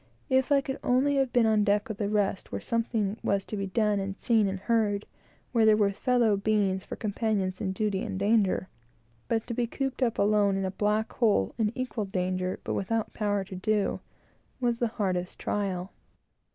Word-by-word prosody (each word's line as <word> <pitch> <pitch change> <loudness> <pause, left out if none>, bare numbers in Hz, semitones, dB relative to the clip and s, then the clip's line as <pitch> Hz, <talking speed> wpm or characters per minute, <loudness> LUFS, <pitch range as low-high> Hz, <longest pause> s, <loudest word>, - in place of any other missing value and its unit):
If 260 +1 +3
I 280 -1 +5
could 265 0 -5
only 270 +3 +2
have 265 -2 +1
been 240 -2 +4
on 215 -1 +3
deck 205 0 +2
with 220 -3 -6
the 205 -2 0
rest, 205 -2 0
where - - -3
something 225 -2 -1
was 200 -1 0
to - - -5
be 195 -1 -2
done, 210 +1 +1
and 195 0 -4
seen, 225 -4 +3
and 190 0 -3
heard; 210 -2 +1 0.5
where 230 -2 +3
there 215 -1 +6
were 205 -2 +3
fellow 235 0 +2
beings 200 -2 +1
for - - -7
companions 205 -3 -1
in 190 -3 -1
duty 195 0 -1
and - - -4
danger 200 -2 +2 0.6
but 225 -1 0
to 235 - -4
be 240 0 0
cooped 270 +2 -3
up 240 -3 +1
alone 205 -1 +3
in 195 - -1
a 190 - -2
black 210 +3 0
hole, 210 - +2
in 215 -2 +2
equal 250 -4 -2
danger, 185 -1 -2
but - - -3
without 225 +3 -1
the - - -19
power 205 -2 +1
to 190 0 -9
do, 205 +2 0 0.6
was 240 -2 0
the 240 - +2
hardest 185 -4 -1
trial. 190 -2 -2
210 Hz, 200 wpm, -28 LUFS, 195-230 Hz, 0.6 s, there